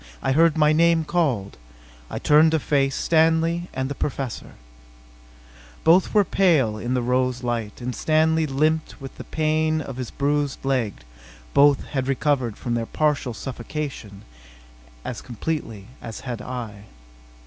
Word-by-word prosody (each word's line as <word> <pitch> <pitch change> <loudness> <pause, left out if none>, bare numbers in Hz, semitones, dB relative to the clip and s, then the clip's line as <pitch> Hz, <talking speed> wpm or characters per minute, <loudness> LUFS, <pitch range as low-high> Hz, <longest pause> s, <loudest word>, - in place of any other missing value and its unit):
I - - -1
heard 165 +3 +4
my 150 0 +4
name 165 0 +4
called. 135 - -1 0.5
I - - -5
turned 155 +2 +5
to 160 - +3
face 135 -1 +1
Stanley 165 +1 +2
and 130 0 -2
the 140 - -3
Professor. 135 -3 -4 1.3
Both 175 +3 +4
were 205 -2 +4
pale 145 - +2
in 125 +3 -2
the 125 - 0
rose 125 0 0
light, 115 -2 -3
and 125 +1 -4
Stanley 160 0 +2
limped 155 +3 0
with 135 -1 -9
the - - -7
pain 155 0 0
of 135 -4 -6
his 125 -3 -4
bruised 145 -1 -1
leg: 125 -7 0
but - - -20 0.5
both 140 -1 +5
had 135 -2 -2
recovered 135 -5 0
from 120 - -3
their 115 -1 -1
partial 145 -6 0
suffocation 120 -3 -6 0.8
as - - -5
completely 115 -5 -5 0.2
as 115 -2 -7
had 120 -5 -5
I. 115 -5 -7
135 Hz, 150 wpm, -23 LUFS, 120-155 Hz, 1.3 s, turned